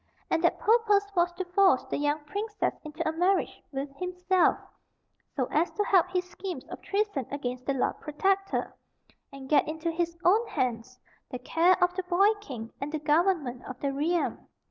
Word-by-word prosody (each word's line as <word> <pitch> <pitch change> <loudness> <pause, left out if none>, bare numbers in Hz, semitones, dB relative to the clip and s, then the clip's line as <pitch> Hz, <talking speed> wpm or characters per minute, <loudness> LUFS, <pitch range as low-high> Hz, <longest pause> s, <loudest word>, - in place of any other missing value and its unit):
And 325 - +1
that 345 - +3
purpose 420 -3 +3
was 350 0 +3
to 370 +1 -4
force 360 -7 +4
the 260 - -3
young 295 +1 0
princess 415 +7 -2
into 310 +2 -4
a - - +2
marriage 360 +4 0
with 275 0 -5
himself, 360 0 +2 0.8
so 260 - +1
as 330 +4 +2
to 415 - 0
help 370 -3 +3
his 365 0 -1
schemes 365 -6 -6
of - - -8
treason 400 - -1
against 255 -3 -5
the 275 - +1
Lord 255 - -1
Protector, 390 +6 -1 0.6
and 275 -1 -10
get 295 - +3
into 320 +2 -2
his 335 0 -2
own 430 +6 +4
hands 255 - -3 0.3
the 250 - -4
care 330 +8 +3
of 355 0 +2
the 375 - -2
boy 380 +4 +3
king 240 - -8
and 285 +1 -3
the 315 - -1
government 300 -4 +1
of 260 -1 -8
the 280 -1 -1
realm. 325 +5 -1
335 Hz, 180 wpm, -28 LUFS, 280-375 Hz, 0.8 s, force